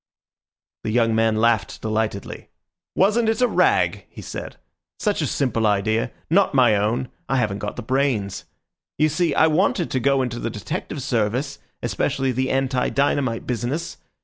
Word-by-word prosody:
The - - -2
young 115 0 +2
man 110 0 +2
laughed 110 -1 +1
delightedly. 110 -2 -3 0.5
"Wasn't 220 +4 +3
it 225 - 0
a 250 - +4
rag?" - - +2
he - - -11
said. - - -7 0.4
"Such 210 -5 0
a 150 - 0
simple 115 -5 0
idea—not 110 - +1
my 120 -5 +5
own. 110 +5 0 0.2
I 135 - +1
haven't 105 -5 0
got 105 - -4
the - - -6
brains. 120 -6 -1 0.5
You 155 - +3
see, 165 +3 0
I - - +5
wanted 170 +2 +1
to 130 - +1
go 135 +1 +2
into 120 -1 -4
the - - -2
detective 140 - -5
service, 125 +3 -1 0.2
especially 135 -1 0
the 130 +2 -1
anti 130 -1 0
dynamite 135 -2 0
business. 125 +7 -3
125 Hz, 155 wpm, -22 LUFS, 110-145 Hz, 0.5 s, my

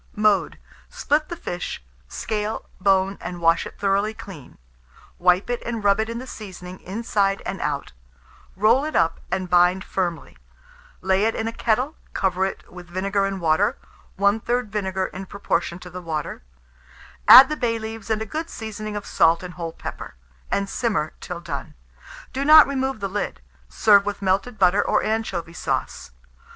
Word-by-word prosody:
Mode. 210 -2 +2 0.3
Split 300 +1 0
the 345 - -4
fish; 175 - -5 0.2
scale, 210 - -3
bone, 195 0 +2
and 175 -1 -6
wash 165 0 +3
it - - -13
thoroughly 200 +2 0
clean; 180 -12 -11 0.6
wipe 180 +2 +3
it, 245 0 -2
and 230 -2 -4
rub 200 +1 +4
in 230 +1 -2
the 255 - -6
seasoning 185 -6 -9
inside 200 -1 -1
and 195 - -4
out; 140 - -3 0.6
roll 220 +8 +4
it 310 +1 -4
up, 165 - +2
and 185 0 -1
bind 180 +2 +4
firmly; 170 - -3 0.6
lay 190 +2 +2
it 225 - +1
in 225 - -2
a 225 - -3
kettle, 250 +8 0 0.2
cover 190 0 +1
it 195 - -7
with 180 -1 -10
vinegar 195 +2 0
and 195 -1 -4
water 160 -2 +2 0.4
(1/3 225 +5 +1
vinegar, 190 -2 -2
in 190 +1 -7
proportion 170 -3 -2
to 180 0 -11
the 180 +1 -7
water); 160 -3 -4 0.9
add 265 - +12
the 305 - -2
bay 235 -5 0
leaves 220 -1 -7
and 220 0 0
a - - -8
good 315 +9 -4
seasoning 215 -1 -6
of 205 - -5
salt 165 +2 +3
and 180 -1 -7
whole 165 -2 -5
pepper, - - -8 0.3
and 200 0 0
simmer 205 -8 -1
till 175 -1 -6
done. 175 - -6 0.6
Do 270 - -1
not 305 +1 +9
remove 265 -4 -2
the 200 - -1
lid. 200 - -3 0.3
Serve 205 -2 +4
with 205 -1 -3
melted 195 +5 0
butter 195 +1 +4
or - - +1
anchovy 195 -6 -2
sauce. - - -3
200 Hz, 165 wpm, -23 LUFS, 180-220 Hz, 0.9 s, add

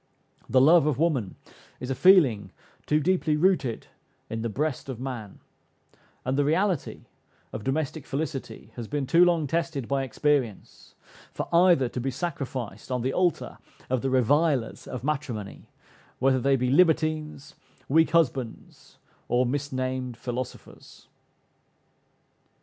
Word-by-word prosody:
"The 130 - +4
love 155 +3 +6
of 145 -5 +1
woman" 140 - 0 0.4
is 125 +1 -5
a - - +2
feeling 130 - +4 0.4
too 150 - +3
deeply 155 -1 +1
rooted 160 -9 +1 0.5
in 115 0 -3
the 115 - -2
breast 140 +4 -3
of 125 -3 -5
man, 120 -6 -6 0.9
and 130 - 0
the - - +4
reality 170 +2 0 0.5
of 105 - -5
domestic 145 +2 -2
felicity 140 0 -5
has 115 -2 -5
been 145 +1 -2
too 165 +7 +5
long 170 -3 +3
tested 160 -4 -2
by 140 -1 0
experience, 135 -4 -2 0.4
for - - -4
either 170 -6 +5
to 125 - -5
be 135 - -1
sacrificed 130 - -5
on 125 -2 -1
the 130 +1 -1
altar 180 -3 -1 0.3
of 130 -2 +1
the 135 - -1
revilers 130 0 +1
of 125 -1 -6
matrimony, 135 -8 -4 0.5
whether 130 0 +2
they 135 +2 +2
be 125 -1 0
libertines, 155 -2 +1 0.3
weak 160 +3 +4
husbands, 135 -8 -2 0.3
or 125 +1 +2
misnamed 130 -2 -3
"philosophers." 125 +1 -8
135 Hz, 135 wpm, -26 LUFS, 125-155 Hz, 0.9 s, love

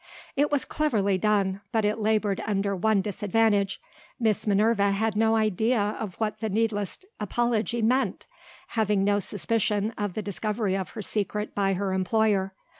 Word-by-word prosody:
It 290 +2 +2
was 290 -2 +1
cleverly 210 -11 +1
done, 200 -1 +1
but 220 -2 +1
it 210 +2 0
laboured 215 -2 +1
under 200 -1 0
one 210 +2 +2
disadvantage. 205 0 +1 0.4
Miss 220 -3 +1
Minerva 205 0 +3
had 210 +2 0
no 225 +1 +3
idea 220 +2 +2 0.2
of 200 -5 -5
what 215 -1 -2
the 220 - -2
needless 210 -1 -1 0.2
apology 235 +2 0
meant, 255 +4 +1 0.4
having 210 -3 +1
no 205 0 +2
suspicion 210 +1 0
of 205 -3 -2
the 215 - -3
discovery 205 0 -1
of 190 -1 -3
her 215 - -4
secret 210 +1 -2
by 195 -1 +1
her 190 0 -1
employer. 195 0 +1
210 Hz, 155 wpm, -26 LUFS, 200-220 Hz, 0.4 s, Minerva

